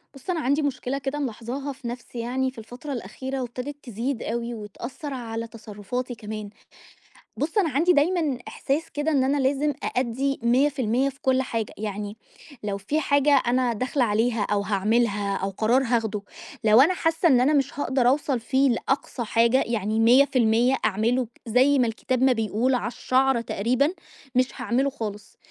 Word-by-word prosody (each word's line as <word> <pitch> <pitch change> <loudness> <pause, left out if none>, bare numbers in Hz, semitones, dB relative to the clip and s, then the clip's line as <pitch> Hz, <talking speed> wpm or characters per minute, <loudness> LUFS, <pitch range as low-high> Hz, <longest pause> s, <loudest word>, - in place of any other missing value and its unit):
بُص، 275 +7 -12
أنا 345 - 0
عندي 285 +1 +1
مشكلة 275 -2 -2
كده 275 +2 -3
ملاحظاها 260 +2 -4
في 265 -2 -9
نَفْسي 240 0 -7
يعني 255 +3 -1
في 255 - -24
الفترة 245 +6 -7
الأخيرة 260 +4 -5
وابتدت 250 +4 -5
تزيد 240 +2 -3
أوي 235 +1 -3
وتأثّر 235 - -7
على 230 -2 -4
تصرُّفاتي 230 +3 -6
كمان. 215 -1 -6 0.9
بُص، 320 +7 -2
أنا 380 -6 +3
عندي 320 +6 +3
دايمًا 310 -2 +2
إحساس 295 +5 -2
كده 295 +2 -1
إن 275 -3 +3
أنا 275 +2 +1
لازم 285 +2 +1
أأدّي 260 +3 -1
100% 260 0 +2
في 270 0 -15
كل 260 0 +2
حاجة، 230 -5 -3
يعني 210 0 -5 0.5
لو 200 -1 -2
في 210 +11 -1
حاجة 285 -1 +3 0.2
أنا 245 0 +2
داخلة 255 +4 0
عليها 225 +1 +1
أو 205 -1 +2
هاعملها 205 0 +1
أو 195 - -2
قرار 225 +7 +2
هاخده، 225 -4 0 0.4
لو 220 +2 +7
أنا 325 +7 +5
حاسّة 325 -1 +1
إن 255 -6 +5
أنا 280 +4 +3
مش 280 -1 0
هاقدر 265 -3 +1
أوصل 275 -1 +1
فيه 265 +4 +2
لأقصى 255 +1 -1
حاجة 235 +4 +3
يعني 220 -1 -1
100% 245 0 +4
أعمله 225 +4 +1 0.2
زي 260 +5 +4
ما 245 - +3
الكتاب 245 +3 -2
ما 265 -1 +5
بيقول 225 +3 0
على 240 - -1
الشَعْرة 255 +1 +1
تقريبًا، 240 +6 +1 0.5
مش 255 0 +4
هاعمله 250 +3 +1
خالص. 215 -6 -7
250 Hz, 165 wpm, -25 LUFS, 225-275 Hz, 0.9 s, لو